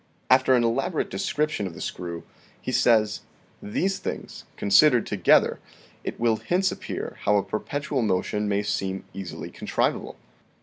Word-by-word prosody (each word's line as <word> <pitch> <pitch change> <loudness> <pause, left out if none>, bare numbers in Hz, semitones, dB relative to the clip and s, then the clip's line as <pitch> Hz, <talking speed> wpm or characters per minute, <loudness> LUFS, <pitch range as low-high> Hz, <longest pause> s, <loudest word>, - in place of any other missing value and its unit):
After 130 0 +6
an 120 - +3
elaborate 115 0 0
description 150 -9 -1
of 85 - -9
the - - -9
screw, 85 -2 -5 0.4
he - - -4
says: 110 -3 +3 0.4
"These 190 - -1
things, - - -6
considered 120 +5 +5
together, 95 -4 +3 0.4
it - - -5
will 115 -1 +2
hence 180 - +1
appear - - -5
how 105 0 +3
a 100 - +1
perpetual 140 +4 -2
motion 105 0 0
may 100 0 +1
seem 95 -1 -2
easily 95 -2 -7
contrivable. - - -1
110 Hz, 140 wpm, -25 LUFS, 100-130 Hz, 0.4 s, After